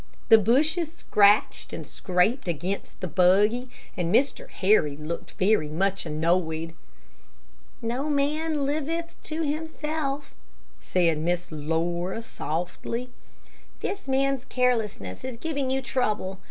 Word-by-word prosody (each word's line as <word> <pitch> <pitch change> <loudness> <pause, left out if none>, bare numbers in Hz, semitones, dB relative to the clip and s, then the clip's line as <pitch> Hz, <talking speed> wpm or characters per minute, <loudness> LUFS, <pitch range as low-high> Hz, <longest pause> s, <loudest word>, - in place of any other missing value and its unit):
The 225 -1 +9
bushes 305 - +2
scratched 205 -9 +3
and - - -5
scraped 190 +7 +1
against 175 +4 -3
the 185 - -2
buggy, 205 +8 +3 0.3
and 175 -3 -1
Mr. 275 +7 +2
Harry 185 -8 +2
looked 155 +3 -6
very 190 -6 +2
much 190 +3 0
annoyed. 160 +1 0 1.1
"No 250 +6 -1
man 295 +1 0
liveth 315 +4 -2
to 320 +1 -2
himself," 300 -2 -3 0.5
said 170 -4 +1
Miss 175 +2 -1
Laura, 170 +7 -1
softly. 225 +8 -4 0.7
"This 390 -5 -4
man's 270 -1 +1
carelessness 225 - -1
is 255 -2 -5
giving 280 -1 -2
you 265 0 0
trouble. 215 -7 -1
220 Hz, 115 wpm, -26 LUFS, 175-275 Hz, 1.1 s, The